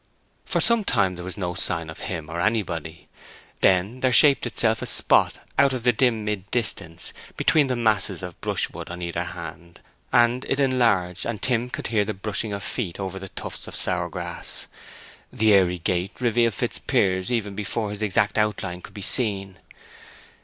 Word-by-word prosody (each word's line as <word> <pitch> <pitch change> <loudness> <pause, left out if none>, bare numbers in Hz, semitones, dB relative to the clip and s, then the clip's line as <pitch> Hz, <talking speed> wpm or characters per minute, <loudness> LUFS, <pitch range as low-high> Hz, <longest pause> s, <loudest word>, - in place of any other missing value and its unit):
For - - 0
some 235 -2 +3
time 100 - +1
there 90 0 -8
was 90 -1 -6
no 90 -3 -2
sign 85 -2 -1
of 80 - -9
him 80 -5 -5
or 85 +1 -5
of 90 - +3
anybody. 85 -7 -3 0.5
Then 95 +7 +2
there 130 0 +2
shaped 140 +3 +6
itself - - +2
a - - -4
spot - - +3 0.2
out 140 -1 +5
of 125 -3 -4
the 120 0 +4
dim 115 -2 +1
mid 100 -2 -3
distance, 100 -8 -2 0.2
between 150 -3 +3
the 130 - 0
masses 105 -5 0
of 90 -2 -8
brushwood - - -2
on 90 0 -6
either 85 -1 -2
hand. 85 +1 -9 0.3
And 120 +2 +3
it 135 - -1
enlarged, 115 -10 +1
and 115 -3 -3
Tim 120 +2 0
could - - -6
hear 105 -2 +3
the 105 +1 -4
brushing 105 +2 -3
of 100 -1 -4
feet 100 -9 -4
over 95 0 -4
the 95 0 -9
tufts - - -7
of - - -8
sour - - -1
grass. - - -4 0.7
The 110 -1 +3
airy 90 -2 +4
gait 90 +3 -2
revealed 120 -3 +2
Fitzpiers 95 +3 0
even 105 -4 -1
before 105 +1 -3
his 105 +1 -6
exact 105 +1 +1
outline 100 -4 -1
could 100 - -13
be 100 - -6
seen. 95 -6 +4
100 Hz, 180 wpm, -24 LUFS, 90-120 Hz, 0.7 s, shaped